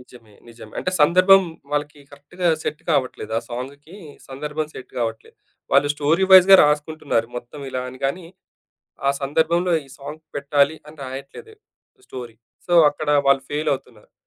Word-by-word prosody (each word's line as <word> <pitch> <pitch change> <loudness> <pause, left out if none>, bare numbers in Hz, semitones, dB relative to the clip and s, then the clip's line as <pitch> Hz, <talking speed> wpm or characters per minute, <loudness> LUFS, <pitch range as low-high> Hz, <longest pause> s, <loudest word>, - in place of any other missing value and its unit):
నిజమే. 120 -4 -18
నిజమే. 115 -2 -13
అంటే - - -2
సందర్భం 185 +5 +6 0.3
వాళ్ళకి 145 0 -2
కరెక్ట్‌గా 170 +5 -4
సెట్ 150 - -4
కావట్లేదు. 130 -7 -1
ఆ - - -4
సాంగ్‌కి 140 +8 -8 0.3
సందర్భం 150 +3 -4
సెట్ 130 - -10
కావట్లేదు. 115 -1 -4 0.4
వాళ్ళు 145 - +4
స్టోరీ 155 +6 +1
వై‌జ్‌గా 190 +1 +9
రాసుకుంటున్నారు. 150 -5 0
మొత్తం 120 +4 -9
ఇలా 130 -1 -3
అని 130 0 -12
గానీ, 170 +5 -4 0.8
ఆ - - +5
సందర్భంలో 165 +5 +1
ఈ - - -20
సాంగ్ 150 +3 -9
పెట్టాలి 140 +2 +1
అని 155 - -14
రాయట్లేదు. 135 - -9 0.5
స్టోరీ. 120 -3 -9 0.3
సో, 175 - 0 0.2
అక్కడ 145 +1 -5 0.2
వాళ్ళు 140 -1 +4
ఫెయిలవుతున్నారు. 140 -7 -4
145 Hz, 140 wpm, -21 LUFS, 130-160 Hz, 0.8 s, వై‌జ్‌గా